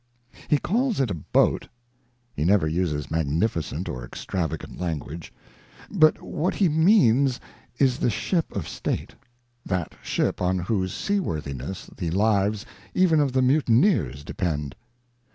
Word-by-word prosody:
He 150 - +4
calls 230 - 0
it 130 -6 +1
a - - 0
boat 80 - +1 0.7
(he - - -1
never 95 -1 +3
uses 75 -3 -1
magnificent 80 +2 -1
or 65 - -4
extrava 80 +6 -3
gant - - -11
language), 80 -2 -4 0.6
but 155 -6 +4
what 170 +5 -2
he 195 - +3
means 145 - +4 0.4
is 130 -2 +2
the - - +2
ship 165 - -1
of 100 -6 -3
State, - - -3 0.5
that 90 -4 -2
ship - - -1
on 90 +1 +1
whose 95 0 -1
seaworthiness 80 - -3
the 85 - -3
lives 105 +3 +1 0.3
even 175 -4 +4
of 145 -3 +2
the 130 0 +2
mutineers 125 - +2
depend. 75 -4 -3
100 Hz, 135 wpm, -25 LUFS, -, 0.7 s, He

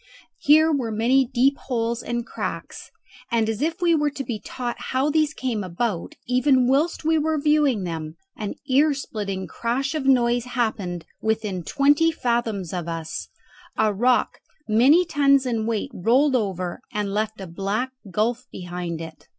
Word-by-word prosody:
Here 315 +2 +5
were 265 -6 0
many 245 +5 +3
deep 260 +3 +2
holes 235 -2 -2
and 240 0 -3
cracks, - - -6 0.4
and 230 -2 +2
as 225 +2 -2
if 330 +4 -1
we 340 -1 +4
were 300 -2 +2
to 280 -1 -5
be 235 -5 -4
taught 240 +2 -5
how 265 +3 +1
these 310 0 +2
came 245 -8 -3
about, 185 +1 -3
even 255 0 +3
whilst 295 +7 +1
we 320 0 +3
were 310 0 0
viewing 290 -7 +2
them 160 -2 -5 0.2
an 210 -2 -5
ear 285 +2 +4
splitting 200 -7 -4
crash 260 +4 -2
of 295 -4 -2
noise 240 -2 +3
happened 215 -9 -2 0.2
within 215 -4 -1
twenty 290 - +3
fathoms 235 - -1
of 175 -2 -3
us, 165 -1 -5 0.5
a 215 -1 +2
rock 245 +5 +2 0.3
many 265 +11 +5
tons 275 -4 +3
in 225 -3 -1
weight 225 -2 -2
rolled 260 +9 +3
over, 185 -6 -2
and 205 -1 -2
left 215 0 -2
a 190 - -6
black 200 +8 -2 0.2
gulf 230 +7 -1
behind 175 -2 -5
it. 160 -2 -10
240 Hz, 160 wpm, -23 LUFS, 205-275 Hz, 0.5 s, Here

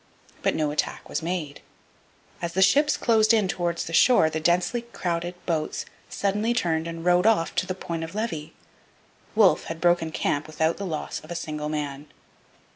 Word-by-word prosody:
But - - +1
no 150 -2 0
attack 150 - -2
was - - -3
made. 160 -4 -4 0.8
As 170 -1 -3
the 190 - +4
ships 290 +10 +4
closed 225 -1 +4
in 210 -3 +2
towards 175 -2 -1
the 165 - -7
shore 165 -5 +5
the 160 - -2
densely 175 +8 +1
crowded 175 -6 -3
boats 160 -3 -2 0.2
suddenly 210 +4 0
turned 165 -6 0
and 165 0 -6
rowed 180 +3 +4
off 210 -7 +2
to 185 - +1
the 185 - -3
Point 170 -3 -4
of 165 +4 -7
Levy. 185 -9 -3 0.8
Wolfe - - +4
had 165 0 -6
broken 175 -1 +2
camp 145 -1 -1
without 160 +1 0
the 200 - -4
loss 155 -3 -4
of - - -16
a 175 - -4
single 150 -2 -4
man. 145 -1 -4
170 Hz, 180 wpm, -25 LUFS, 160-195 Hz, 0.8 s, shore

